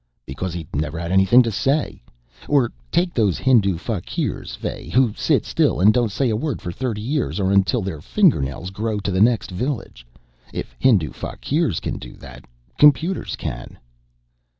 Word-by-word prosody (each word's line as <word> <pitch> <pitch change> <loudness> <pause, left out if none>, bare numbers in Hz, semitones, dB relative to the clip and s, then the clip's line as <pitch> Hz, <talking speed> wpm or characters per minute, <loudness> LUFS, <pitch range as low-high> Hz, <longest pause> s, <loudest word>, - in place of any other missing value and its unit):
"Because 85 +6 -5
he'd 80 -5 -7
never 75 +2 -2
had 85 +1 -4
anything 95 +7 +6
to 115 - -2
say. 135 +8 -1 0.5
Or 135 -5 +2 0.2
take 175 0 +1
those 105 -6 +1
Hindu 105 -9 +3
fakirs, 95 0 -4
Fay, - - -6
who 125 -4 +3
sit - - +1
still - - +1
and 105 +4 +6
don't 120 -4 +1
say 125 +3 0
a - - 0
word 140 +3 -2
for 85 - -5
thirty 115 +1 -3
years 135 -2 -2
or 95 -1 +1
until 100 +3 +2
their 85 -6 -5
fingernails 90 - +1
grow 110 +2 -2
to 100 0 -3
the 95 +1 +1
next 115 -3 +2
village. 100 - -4 0.4
If - - -6
Hindu 95 - +3
fakirs 140 - -2
can - - -4
do - - -10
that, - - -13 0.3
computers 155 +6 +3
can!" - - -7
105 Hz, 170 wpm, -21 LUFS, 90-130 Hz, 0.5 s, anything